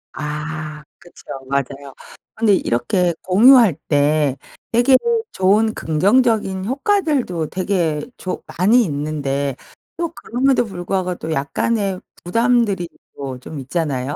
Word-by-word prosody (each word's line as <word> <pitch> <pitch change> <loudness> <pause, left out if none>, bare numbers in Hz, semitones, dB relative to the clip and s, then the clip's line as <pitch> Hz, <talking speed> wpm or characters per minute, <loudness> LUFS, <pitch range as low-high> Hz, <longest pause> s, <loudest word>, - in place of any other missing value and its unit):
아 150 0 -5 0.2
그쵸. 175 0 -17 0.3
맞아요. 140 0 -3 0.4
근데 220 -2 +3
이렇게 170 +10 0
공유할 220 - +6
때 145 -1 +2 0.3
되게 245 +3 +5 0.4
좋은 210 +4 +2
긍정적인 195 +2 +1
효과들도 275 - 0
되게 175 -5 -1 0.2
조 185 - -5
많이 225 +7 +5
있는데 140 - -2 0.4
또 340 -1 -1
그럼에도 250 +1 +1
불구하고 185 -1 -3
또 160 -1 -6
약간의 195 +7 -1 0.2
부담들이 230 -2 +1 0.3
또 135 -2 -6
좀 145 +3 -8
있잖아요. 140 -1 -2
180 Hz, 245 characters per minute, -19 LUFS, 150-225 Hz, 0.4 s, 공유할